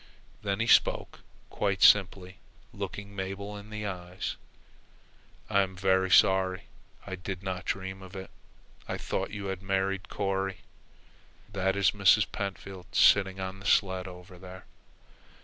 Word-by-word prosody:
Then 100 Hz, 0 st, -2 dB
he 115 Hz, -, +1 dB
spoke, 115 Hz, -, +3 dB, 0.3 s
quite 100 Hz, -2 st, 0 dB
simply, 95 Hz, -2 st, +4 dB, 0.4 s
looking 100 Hz, 0 st, -6 dB
Mabel 100 Hz, +2 st, -5 dB
in 105 Hz, +1 st, -10 dB
the 105 Hz, 0 st, -5 dB
eyes. 90 Hz, -2 st, -5 dB, 1.1 s
"I 100 Hz, -, +3 dB
am 95 Hz, -1 st, -3 dB
very 95 Hz, 0 st, +2 dB
sorry. 95 Hz, 0 st, +4 dB, 0.4 s
I 95 Hz, -, -7 dB
did 95 Hz, 0 st, -6 dB
not 95 Hz, -2 st, -4 dB
dream 95 Hz, 0 st, -4 dB
it. 95 Hz, 0 st, -9 dB, 0.6 s
I -, -, -3 dB
thought -, -, -3 dB
you 100 Hz, -2 st, -6 dB
had 95 Hz, -, -10 dB
married 95 Hz, 0 st, -1 dB
Corry. 95 Hz, -2 st, -2 dB, 0.9 s
That 95 Hz, 0 st, 0 dB
is 100 Hz, -2 st, +3 dB
Mrs. 105 Hz, +1 st, +4 dB
Pentfield 100 Hz, -3 st, -6 dB
sitting 95 Hz, -2 st, +5 dB
on 95 Hz, 0 st, -5 dB
the 95 Hz, -, -6 dB
sled 95 Hz, -2 st, +2 dB
over 90 Hz, 0 st, -12 dB
there." 95 Hz, 0 st, -11 dB
95 Hz, 135 wpm, -29 LUFS, 95-100 Hz, 1.1 s, sitting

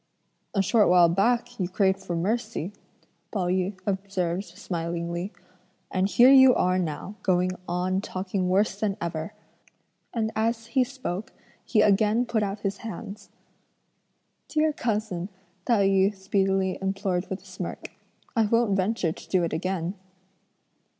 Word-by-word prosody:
"A 195 Hz, -, +3 dB
short 215 Hz, +2 st, +4 dB
while 175 Hz, -1 st, +6 dB
back 230 Hz, +8 st, +1 dB
you 180 Hz, -2 st, -1 dB
craved 190 Hz, 0 st, +2 dB
for 175 Hz, -, -4 dB
mercy," 210 Hz, 0 st, -2 dB, 0.6 s
Pao 195 Hz, -4 st, -1 dB
yü 185 Hz, +1 st, -1 dB
observed 195 Hz, -2 st, -1 dB
smilingly, 170 Hz, 0 st, -4 dB, 0.6 s
"and 185 Hz, +1 st, +1 dB
here 245 Hz, +5 st, +7 dB
you 265 Hz, -2 st, +8 dB
are 185 Hz, 0 st, +2 dB
now 170 Hz, +3 st, -3 dB
going 185 Hz, -1 st, +2 dB, 0.2 s
on 180 Hz, +2 st, 0 dB
talking 185 Hz, -1 st, -2 dB
worse 195 Hz, +1 st, +2 dB
than 205 Hz, -2 st, -1 dB
ever;" 170 Hz, +4 st, -4 dB, 0.8 s
and 220 Hz, -2 st, -1 dB
as 225 Hz, +1 st, 0 dB
he 260 Hz, +2 st, +2 dB
spoke 245 Hz, -7 st, -5 dB, 0.3 s
he 215 Hz, -, +2 dB
again 215 Hz, +3 st, +3 dB
put 235 Hz, -2 st, 0 dB
out 200 Hz, 0 st, -3 dB
his 200 Hz, -1 st, -2 dB
hands. 205 Hz, -1 st, -8 dB, 1.2 s
"Dear 310 Hz, 0 st, +1 dB
cousin," 210 Hz, -7 st, -2 dB, 0.4 s
Tai 205 Hz, -5 st, +3 dB
yü 195 Hz, +1 st, +3 dB
speedily 190 Hz, -1 st, 0 dB
implored 195 Hz, -1 st, -1 dB
with 190 Hz, -, -5 dB
a -, -, -21 dB
smirk, -, -, -6 dB, 0.4 s
"I 225 Hz, -2 st, +3 dB
won't 230 Hz, -2 st, +2 dB
venture 190 Hz, -3 st, 0 dB
to -, -, -11 dB
do 185 Hz, -2 st, +2 dB
it 170 Hz, -, -2 dB
again." 180 Hz, +1 st, -2 dB
195 Hz, 140 wpm, -26 LUFS, 180-215 Hz, 1.2 s, you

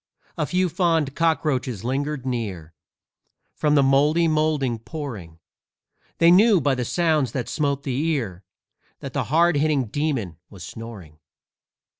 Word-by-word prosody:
A 150 Hz, -, -2 dB
few 185 Hz, 0 st, +1 dB
fond 165 Hz, -5 st, 0 dB
cockroaches 145 Hz, -, 0 dB
lingered 135 Hz, +2 st, -2 dB
near, 100 Hz, -11 st, -4 dB, 0.8 s
From 150 Hz, -1 st, +1 dB
the 140 Hz, -, +5 dB
mouldy 145 Hz, +5 st, +3 dB
moulding 155 Hz, -6 st, 0 dB
pouring; 115 Hz, -, -7 dB, 0.8 s
They 170 Hz, 0 st, +5 dB
knew, 205 Hz, +2 st, +6 dB
by 140 Hz, -2 st, +1 dB
the 125 Hz, -2 st, -2 dB
sounds 155 Hz, -3 st, +1 dB
that 125 Hz, -4 st, -3 dB
smote 140 Hz, -2 st, -1 dB
the 135 Hz, +1 st, -2 dB
ear, 115 Hz, -, -2 dB, 0.6 s
That -, -, -7 dB
the -, -, -1 dB
hard 165 Hz, +1 st, +3 dB
hitting 145 Hz, -3 st, +1 dB
demon 120 Hz, -, -2 dB
was 95 Hz, -4 st, -11 dB
snoring. 95 Hz, -7 st, -10 dB
140 Hz, 135 wpm, -23 LUFS, 115-155 Hz, 0.8 s, knew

